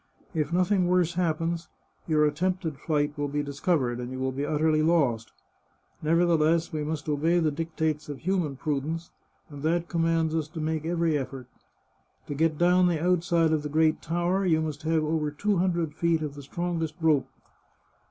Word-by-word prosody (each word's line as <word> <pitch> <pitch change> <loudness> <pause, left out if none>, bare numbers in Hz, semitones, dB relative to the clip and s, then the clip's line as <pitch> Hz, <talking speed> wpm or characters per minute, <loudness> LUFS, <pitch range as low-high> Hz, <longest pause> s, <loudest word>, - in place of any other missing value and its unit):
If 155 -2 -1
nothing 185 +1 +2
worse 180 -2 +2
happens, 165 -1 -1 0.4
your 155 -2 +3
attempted 165 0 -1
flight 150 -2 0
will 145 - 0
be 145 +1 -2
discovered, 140 -3 0
and 125 +1 -5
you 130 - -5
will 130 0 -1
be 135 +2 -3
utterly 155 0 +2
lost. 140 -9 +1 0.7
Nev 160 +2 +2
ertheless 165 -1 +2
we 155 -1 -2
must 150 0 -4
obey 155 +4 +2
the 160 -2 +1
dictates 160 -1 -2
of 145 - -5
human 175 -5 -1
prudence, 155 +4 -3 0.4
and 145 -1 -9
that 170 +3 0
commands 165 -1 +1
us 160 -2 -1
to 160 +1 -8
make 155 0 -2
every 170 -1 +1
eflFort, 135 -3 -3 0.8
To - - -5
get 155 +1 +1
down 180 +2 +4
the 170 -3 +1
outside 170 -1 +2
of 155 - +1
the 150 - -5
great 155 +1 +2
tower 175 +4 0
you 165 -4 +3
must 155 -2 -3
have 160 0 +1
over 155 -1 0
two 200 +7 0
hundred 170 -4 0
feet 165 -1 +1
of 150 -2 -4
the 145 - -9
strongest 165 +1 -3
rope. 155 -4 +2
160 Hz, 180 wpm, -27 LUFS, 150-170 Hz, 0.8 s, down